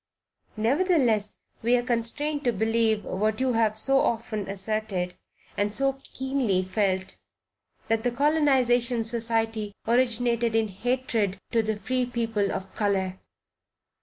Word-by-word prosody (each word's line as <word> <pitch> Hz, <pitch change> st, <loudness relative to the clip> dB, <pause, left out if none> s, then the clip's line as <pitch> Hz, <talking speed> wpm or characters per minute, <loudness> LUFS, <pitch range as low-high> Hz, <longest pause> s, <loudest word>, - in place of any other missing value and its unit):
Nevertheless, 240 Hz, -, +2 dB, 0.2 s
we 235 Hz, +2 st, +3 dB
are 245 Hz, -, +1 dB
constrained 270 Hz, +5 st, -1 dB
to 245 Hz, -, +4 dB
believe 220 Hz, 0 st, +1 dB
what 215 Hz, +4 st, -1 dB
you 260 Hz, -1 st, +1 dB
have 220 Hz, -2 st, +2 dB
so 270 Hz, +4 st, +3 dB
often 220 Hz, -4 st, -1 dB
asserted, 195 Hz, -2 st, -2 dB, 0.4 s
and 205 Hz, 0 st, 0 dB
so 270 Hz, +4 st, +1 dB, 0.2 s
keenly 260 Hz, -8 st, 0 dB
felt, 185 Hz, -1 st, -1 dB, 0.7 s
that 225 Hz, 0 st, +1 dB
"The 245 Hz, -, +1 dB
Colonization 255 Hz, -4 st, +2 dB
Society 225 Hz, -2 st, -1 dB
originated 235 Hz, -1 st, +2 dB
in 220 Hz, -1 st, +2 dB
hatred 225 Hz, -2 st, -1 dB
to 230 Hz, -, +3 dB
the 220 Hz, 0 st, -1 dB
free 255 Hz, +3 st, -1 dB
people 225 Hz, -4 st, -1 dB
of 190 Hz, 0 st, -5 dB
color." 190 Hz, -3 st, -1 dB
225 Hz, 125 wpm, -26 LUFS, 210-245 Hz, 0.7 s, to